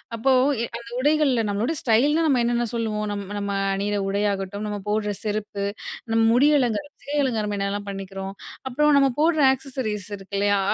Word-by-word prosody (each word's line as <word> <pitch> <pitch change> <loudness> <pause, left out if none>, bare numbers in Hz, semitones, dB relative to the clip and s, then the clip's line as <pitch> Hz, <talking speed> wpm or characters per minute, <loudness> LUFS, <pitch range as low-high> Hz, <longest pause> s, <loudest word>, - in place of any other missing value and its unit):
அப்போ 265 +4 +2 0.3
எ - - 0
அந்த 235 0 -11
உடைகள்ல 280 -5 +2
நம்மளோட 220 +10 0
ஸ்டைல்னா 285 +8 +3
நம்ம 255 -4 +3
என்னென்ன 240 0 +1
சொல்லுவோம். 215 -2 -1
நம் 200 -1 -3 0.2
நம்ம 200 0 -2 0.2
அணியுற 205 +1 -1
உடையாகட்டும், 200 0 -1
நம்ம 205 -1 -3
போடுற 210 -1 0
செருப்பு, 210 -1 -3 0.5
நம்ம 225 - +3
முடி 280 +5 +5
அலங்கார 245 +3 0 0.2
சிகை 290 +1 -3
அலங்காரம் 215 -5 -1
என்னலாம் 200 +1 -2
பண்ணிக்கிறோம். 195 0 -6 0.3
அப்புறம் 300 +3 +3
நம்ம 275 -1 +4
போடுற 315 -2 +3
ஆக்சஸரீஸ் 250 -7 -4
இருக்கு 195 +1 -6
இல்லயா. 205 0 +3
215 Hz, 160 wpm, -24 LUFS, 200-260 Hz, 0.5 s, முடி